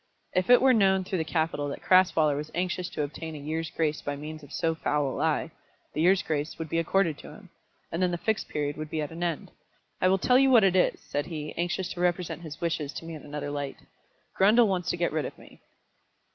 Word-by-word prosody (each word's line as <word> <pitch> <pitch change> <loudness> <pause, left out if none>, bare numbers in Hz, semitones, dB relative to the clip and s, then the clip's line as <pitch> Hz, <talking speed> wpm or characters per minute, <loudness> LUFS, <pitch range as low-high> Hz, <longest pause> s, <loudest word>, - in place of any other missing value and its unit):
If 185 +2 +1
it 245 +1 +7
were 265 -1 +6
known 190 -4 +3
through 185 -1 -2
the - - +1
capital 160 -2 -1
that 140 - -6
Crasweller 180 -5 +4
was 150 +2 -4
anxious 180 0 -1
to 150 - -2
obtain 155 +2 -6
a - - -6
year's 160 +3 -3
grace 155 -2 -1
by 145 - -3
means 155 +2 -7
of 145 0 -14
so 165 0 0
foul 150 -2 0
a - - -5
lie, 160 +1 0 0.4
the 155 - -1
year's 190 +3 +4
grace 150 0 -2
would 160 -1 -5
be 165 - +1
accorded 165 -2 +1
to - - -10
him. - - -14 0.4
And 165 - -2
then 180 - +3
the 175 - -2
Fixed 220 +4 -1
Period 145 -1 -2
would 155 0 -5
be 155 - -3
at 150 - -6
an 165 +1 -8
end. 170 -3 -2 0.5
"I 185 - +4
will 190 +1 +4
tell 250 +6 +4
you 270 0 +5
what 235 -5 +6
it 190 -1 +4
is," 185 - +3
said 145 0 -3
he, 150 -3 -5
anxious 175 +1 -1
to 175 - -6
represent 180 -1 0
his 155 -2 -8
wishes 155 -4 -2
to - - -7
me 165 - -7
in 155 - -8
another 145 0 -5
light. 145 -1 -4 0.6
"Grundle 215 +5 +5
wants 185 -3 -1
to - - 0
get 170 0 0
rid 155 -1 0
of - - -7
me." - - -17
165 Hz, 245 wpm, -27 LUFS, 150-185 Hz, 0.6 s, it